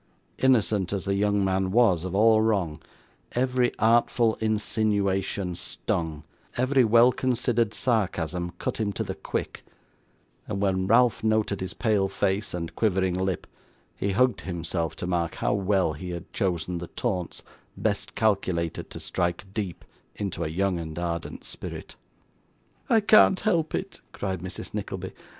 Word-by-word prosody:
Innocent 110 -7 +3
as 100 -2 -2
the 100 - +1
young 100 0 +2
man 95 0 +1
was 100 -6 +4
of 95 0 -3
all 110 +1 +5
wrong, 95 -8 0 0.5
every 125 0 +2
artful 115 0 +3
insinuation 100 -3 0
stung, 80 +1 -3 0.3
every 130 +1 +3
well 115 +2 +6
considered 120 -3 +1
sarcasm 90 -7 0
cut - - -3
him 105 -2 0
to - - -2
the - - -4
quick; - - -4 0.8
and 100 -2 -3
when 95 -1 +1
Ralph 115 +1 +4
noted 110 -3 +1
his 95 +1 -4
pale 105 -4 +2
face 95 0 -1
and 85 -1 -5
quivering 95 -4 +1
lip, 95 -1 -1 0.5
he 100 0 -1
hugged 125 +1 +2
himself 85 -2 -3
to - - -5
mark 85 -2 -1
how - - 0
well 95 -4 +1
he 90 +5 -7
had 85 -1 -7
chosen 90 -3 -1
the 85 - -6
taunts 95 -6 -3 0.3
best - - -1
calculated 95 -6 0
to - - -8
strike 85 +1 -2
deep 100 -6 -4 0.3
into 95 -4 -3
a - - -1
young 90 +2 0
and 80 -1 -6
ardent 85 -1 -4
spirit. - - -8 0.9
'I 225 -2 +5
can't 200 -2 +6
help 170 -7 +1
it,' 195 - -5
cried 95 -3 -3
Mrs. 90 +2 -7
Nickleby. - - -5
100 Hz, 145 wpm, -26 LUFS, 90-110 Hz, 0.9 s, well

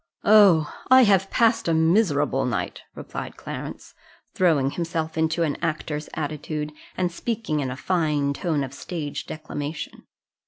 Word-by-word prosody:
"Oh! 195 -8 +6 0.2
I 260 0 +8
have 195 -3 +3
passed 230 -4 +2
a 165 - +2
miserable 160 -5 +2
night," 105 -8 -2
replied - - -7
Clarence, - - -7 0.4
throwing 150 -7 +2
himself 165 -1 -3
into 160 +1 +1
an 150 -3 -1
actor's 155 -2 -3
attitude, 150 0 -4 0.2
and 180 -1 0
speaking 215 -5 -2
in 135 -3 -2
a 130 - -5
fine 150 -5 0
tone 155 -2 -1
of 135 -1 -6
stage 150 0 -5
declamation. 155 -1 -6
160 Hz, 135 wpm, -24 LUFS, 145-180 Hz, 0.4 s, I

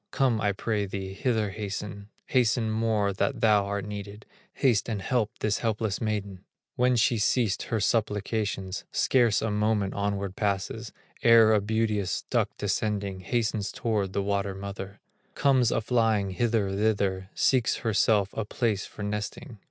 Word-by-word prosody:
Come 125 -5 +1
I 105 - +2
pray 105 0 -2
thee, 95 0 -5
hither 110 -1 0
hasten, 100 0 -6 0.2
Hasten 120 -4 +2
more 110 -2 +1
that - - -1
thou 105 -3 +4
art 100 -1 -3
needed, 105 0 -7 0.3
Haste 120 -6 +2
and 110 -3 -2
help 110 +2 0
this 105 -1 +1
helpless 110 -3 -1
maiden!" 100 -4 -3 0.3
When 125 0 +3
she 120 0 +2
ceased 105 -1 +1
her 115 - 0
supplications, 105 -2 -1
Scarce 120 -6 +3
a 110 - 0
moment 105 -1 +1
onward 100 -1 -2
passes, 105 +2 -2 0.3
Ere 115 -2 +7
a 105 - +3
beauteous 105 -2 -1
duck - - +2
descending, 100 -3 -1
Hastens 105 0 -1
toward 105 -5 -1
the 100 - 0
water 100 -1 -1
mother, 100 0 -7 0.4
Comes 130 -4 +3
a - - +1
flying 110 -4 +1
hither, 110 -1 0
thither, 100 -2 0
Seeks 130 -4 +2
herself 105 -2 +2
a 110 - -2
place 105 -1 -1
for 105 - -8
nesting. 105 +3 -5
105 Hz, 150 wpm, -27 LUFS, 100-115 Hz, 0.4 s, Ere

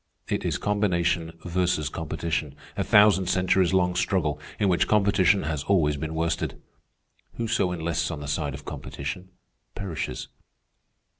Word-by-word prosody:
It - - -1
is - - 0
combination 85 -5 0
versus 90 -4 0
competition, 80 -1 -3 0.2
a - - 0
thousand 105 -3 +5
centuries 95 -1 +2
long 90 -1 +2
struggle, 80 -5 0 0.2
in 105 - +2
which 90 -2 +2
competition 100 -2 +3
has 75 -2 -2
always 80 -7 +3
been 80 +2 -4
worsted. 80 +1 -1 0.8
Whoso 115 -5 0
enlists 85 -1 -1
on 80 -3 -4
the 75 - -6
side 75 -1 -2
of 70 +1 -11
competition 85 +7 -6 0.5
perishes." 95 -6 -4
85 Hz, 135 wpm, -26 LUFS, 80-95 Hz, 0.8 s, thousand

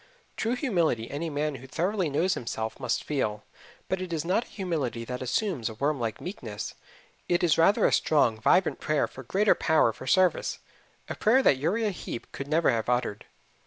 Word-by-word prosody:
True 230 +3 0
humility 170 - 0
any 155 +4 -3
man 150 0 -1
who 135 - -11
thoroughly 180 +4 -1
knows 175 +7 +1
himself 110 -4 -4
must 125 -2 -1
feel; 110 -8 -2 0.4
but 190 0 -1
it 185 -2 -5
is 160 -1 -2
not 190 +7 +1
a - - -19
humility 150 - -3
that 125 +1 -5
assumes 130 - -1
a 110 - -8
worm 140 +4 0
like 115 -2 -3
meekness; 115 - -6 0.6
it 175 0 +2
is 170 -3 +4
rather 165 +5 +4
a - - +3
strong, 115 -8 +2
vibrant 180 - +3
prayer 155 -1 +1
for 130 - -10
greater 195 - +3
power 155 -8 +2
for 130 - -10
service 185 +6 +2 0.5
a - - -3
prayer 255 +5 +3
that 135 - +5
Uriah 205 +10 0
Heep 145 -9 -7
could 140 - -6
never 155 0 +3
have 115 -1 -1
uttered. 120 -4 -1
155 Hz, 190 wpm, -27 LUFS, 125-185 Hz, 0.6 s, that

